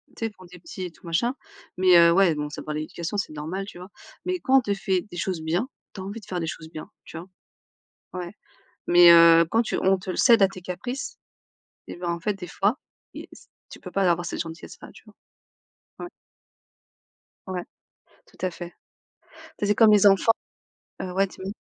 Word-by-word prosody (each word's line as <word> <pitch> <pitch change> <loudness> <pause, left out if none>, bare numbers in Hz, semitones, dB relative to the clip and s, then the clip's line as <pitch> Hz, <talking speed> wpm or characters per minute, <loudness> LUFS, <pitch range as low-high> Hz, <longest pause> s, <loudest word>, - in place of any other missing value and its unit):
tu 225 - -4
sais, - - -1
pour 195 -3 -17
tes 180 0 -14
petits 185 +2 -8
et 180 - -5
tout 165 - -21
machin, 205 +11 0 0.4
mais 185 -1 +6
heu, 170 0 +7
ouais, 180 -1 +4
bon, 150 0 -4
ça 150 - -7
dépend 155 - -5
de 150 - -3
l'éducation, 170 +5 -5
c'est 185 - -3
normal, 160 +6 -5
tu 195 - -11
vois? 180 +2 -11 0.4
Mais 365 -1 -1
quand 270 -3 +3
on - - +5
te 205 -4 -1
fait 190 -2 -1
des 175 - -8
choses 175 -1 -3
bien, 175 +10 -1 0.3
tu 195 - -8
as - - -6
envie 200 +4 -6
de 215 - -16
faire 180 - -4
des 165 - -3
choses 160 -1 -7
bien, 155 -1 -9 0.2
tu - - -10
vois? 170 - -9 0.9
Ouais 180 -1 -6 0.6
mais 175 0 +8
heu, 165 0 +8
quand 230 +1 +3
tu - - -3
on 190 +1 +3
te 190 +1 -10
le 185 - -2
cède 235 -4 +5
à 195 - +7
tes 185 -1 -11
caprices, 245 +10 -6 0.7
et - - -8
bien, 175 0 -5
en 170 0 -2
fait, 210 +4 -1
des 185 -2 -8
fois, 200 - 0 0.9
tu - - -12
peux - - -9
pas 195 - 0
avoir 175 0 0
cette - - -4
gentillesse-là, 165 0 -9
tu - - -17
vois? - - -17 0.9
Ouais. - - -9 1.4
Ouais, 185 -2 -4 0.6
tout - - -24
à - - 0
fait. 175 0 -8 0.7
Tu - - -16 0.2
sais, - - +1
c'est 205 - +2
comme 220 -2 +6
les 205 -1 +5
enfants 195 +3 +5 0.7
heu, 185 - -5
ouais, 195 +2 +2
dis-moi. 190 +1 -8
185 Hz, 215 wpm, -24 LUFS, 170-200 Hz, 1.4 s, mais